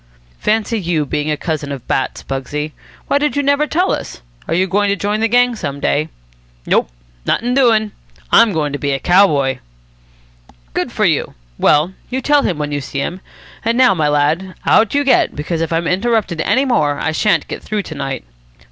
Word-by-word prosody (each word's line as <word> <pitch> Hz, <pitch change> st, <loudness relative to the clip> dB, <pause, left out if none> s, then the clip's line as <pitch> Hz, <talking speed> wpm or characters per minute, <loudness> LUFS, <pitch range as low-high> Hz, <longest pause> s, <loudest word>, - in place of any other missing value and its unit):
"Fancy 220 Hz, +1 st, 0 dB
you 170 Hz, -5 st, -1 dB
being 150 Hz, +1 st, -2 dB
a 150 Hz, -, 0 dB
cousin 155 Hz, -3 st, -3 dB
of 135 Hz, -3 st, -7 dB
Bat's, 130 Hz, -, -1 dB
Pugsy. 145 Hz, +3 st, -4 dB, 0.4 s
Why 280 Hz, -, +2 dB
did 295 Hz, 0 st, 0 dB
you 285 Hz, -, +1 dB
never 285 Hz, +2 st, +2 dB
tell 360 Hz, +5 st, +1 dB
us? -, -, -5 dB, 0.2 s
Are -, -, 0 dB
you 185 Hz, +2 st, +2 dB
going 200 Hz, +2 st, +1 dB
to 200 Hz, -, +2 dB
join 205 Hz, +1 st, -1 dB
the 225 Hz, -, +2 dB
gang 245 Hz, +1 st, +3 dB
some 140 Hz, -9 st, -5 dB
day?" 150 Hz, +2 st, 0 dB, 0.6 s
"Nope. -, -, +2 dB, 0.4 s
Nothin' 245 Hz, +2 st, +1 dB
doin'. 225 Hz, -5 st, +3 dB, 0.4 s
I'm 230 Hz, -2 st, +6 dB
goin' 150 Hz, -5 st, -1 dB
to 145 Hz, -, -3 dB
be 140 Hz, -1 st, -1 dB
a 135 Hz, -, -1 dB
cow 185 Hz, +7 st, +5 dB
boy." 140 Hz, -5 st, 0 dB, 1.1 s
"Good -, -, -2 dB
for -, -, 0 dB
you. -, -, 0 dB, 0.2 s
Well, 155 Hz, +5 st, +3 dB, 0.2 s
you 260 Hz, -, -2 dB
tell 290 Hz, +2 st, +3 dB
him 175 Hz, -, -1 dB
when 150 Hz, -1 st, -3 dB
you 145 Hz, 0 st, -2 dB
see 140 Hz, -, -7 dB
him. 175 Hz, +6 st, -3 dB, 0.4 s
And 230 Hz, +1 st, 0 dB
now, 255 Hz, -3 st, +5 dB
my 155 Hz, -5 st, 0 dB
lad, 150 Hz, +6 st, 0 dB
out 225 Hz, +4 st, +3 dB
you 285 Hz, -, +3 dB
get, 265 Hz, -3 st, +3 dB
because 160 Hz, +3 st, -3 dB
if 165 Hz, -, -2 dB
I'm 165 Hz, +1 st, 0 dB
interrupted 195 Hz, -2 st, 0 dB
any 265 Hz, +2 st, +2 dB
more 150 Hz, -, +1 dB
I 160 Hz, -, -1 dB
shan't 200 Hz, +6 st, +1 dB
get -, -, -6 dB
through 210 Hz, -2 st, -3 dB
to 160 Hz, -, -8 dB
night." 135 Hz, -, -4 dB
180 Hz, 200 wpm, -17 LUFS, 150-230 Hz, 1.1 s, I'm